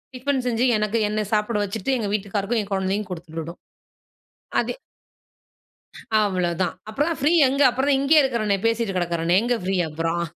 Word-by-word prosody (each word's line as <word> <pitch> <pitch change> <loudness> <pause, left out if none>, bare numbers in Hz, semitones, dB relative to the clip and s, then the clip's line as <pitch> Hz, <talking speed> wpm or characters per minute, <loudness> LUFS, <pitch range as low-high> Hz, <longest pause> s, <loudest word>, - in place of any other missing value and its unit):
Tiffin 265 +1 -1
செஞ்சு, 240 -1 0
எனக்கு 210 +1 0
என்ன 210 +1 -2
சாப்பிட 210 +1 +1
வச்சுட்டு, 220 +6 -3
எங்க 220 -4 -2
வீட்டுக்காருக்கும் 205 +2 -1
என் 200 - -13
கொழந்தைக்கும் 195 +1 -1
குடுத்துவிடும். 165 -1 -7 1.0
அது - - -3 1.5
அவ்வளோதான். 180 -3 0
அப்பறம்தான் 295 +9 -1
ஃப்ரீ 295 +4 +3 0.2
எங்க? 275 +2 0
அப்புறம் 265 +3 -1
தான் 275 - +4
இங்கேயே 300 +2 +5
இருக்கிறனே. 215 -6 0
பேசிட்டு 230 -3 0
கிடக்கிறேனே. 175 0 +1
எங்கே 245 0 +1
ஃப்ரீ 190 +1 0
அப்பறம்? 165 +2 -2
210 Hz, 145 wpm, -23 LUFS, 185-245 Hz, 1.5 s, இங்கேயே